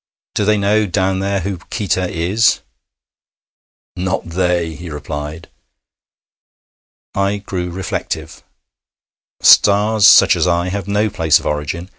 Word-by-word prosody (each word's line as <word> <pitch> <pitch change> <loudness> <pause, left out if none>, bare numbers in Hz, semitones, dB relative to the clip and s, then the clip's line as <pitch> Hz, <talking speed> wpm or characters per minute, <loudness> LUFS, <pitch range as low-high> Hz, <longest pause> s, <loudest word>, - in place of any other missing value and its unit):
Do 105 - -1
they 105 0 +2
know 105 +1 +1
down 95 0 0
there 100 0 -1
who 95 0 -4
Qita 95 -3 -2
is?' 95 +7 +1 1.3
'Not 90 +1 -2
they!' 90 -2 0
he 85 +3 -9
replied. 75 +2 -7 1.7
I 100 +1 0
grew 95 -3 -5
reflective. 85 -3 -5 1.0
Stars 105 +1 +5
such - - +7
as - - 0
I 85 +1 0
have 100 0 -4
no 105 +1 0
place 80 -6 +3
of - - -9
origin. 75 +4 -3
95 Hz, 120 wpm, -17 LUFS, 85-100 Hz, 1.7 s, such